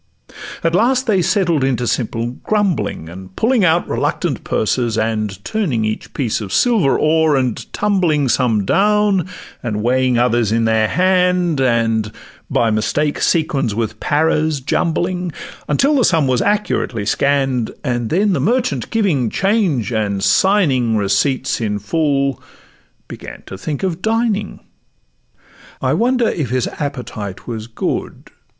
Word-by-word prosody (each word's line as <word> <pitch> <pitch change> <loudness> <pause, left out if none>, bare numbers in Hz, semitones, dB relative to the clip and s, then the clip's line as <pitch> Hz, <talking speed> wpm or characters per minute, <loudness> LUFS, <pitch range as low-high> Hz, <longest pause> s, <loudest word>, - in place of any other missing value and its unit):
At 165 0 +1
last 250 +7 +2
they 205 -6 +2
settled 175 -5 +1
into 125 -2 0
simple 115 0 -2
grumbling, 180 - -1
And 95 +2 -11
pulling 235 -2 +2
out 170 0 +2
reluctant - - -2
purses, 115 0 0
and 110 -3 -1
Turning 150 - -1
each 110 0 -5
piece 120 -5 -1
of 100 -3 -6
silver 195 - +3
o'er, 160 -1 +3
and 130 -4 -2
tumbling 175 -9 +1
Some 115 -5 +1
down, 205 - +2 0.3
and 105 -3 -3
weighing 130 0 +2
others 120 -3 +2
in 115 0 +1
their 110 -1 +2
hand, 180 - +2
And 115 -4 +1 0.4
by 115 -1 +1
mistake 145 +8 0
sequins 140 - +1
with 110 -1 -3
paras 155 0 +1
jumbling, 175 +5 -1 0.4
Until 270 - +2
the 255 - +3
sum 160 -8 +3
was 130 -2 +1
accurately 205 - -1
scann'd, 135 -1 +1
And 120 -4 -2
then 195 +3 +2
the - - 0
merchant 245 +4 0
giving 180 - +1
change, 190 - 0
and 100 -3 -1
signing 135 - +3
Receipts 105 +7 0
in 105 -2 -1
full, 140 +4 0 0.7
began - - -10
to - - -8
think 145 - -5
of 185 -2 -2
dining. 220 -2 -1 1.2
I - - 0
wonder 245 0 +2
if 150 - -2
his 130 0 0
appetite 125 -9 -5
was 110 -2 -5
good? 115 - -4
140 Hz, 135 wpm, -18 LUFS, 115-185 Hz, 1.2 s, silver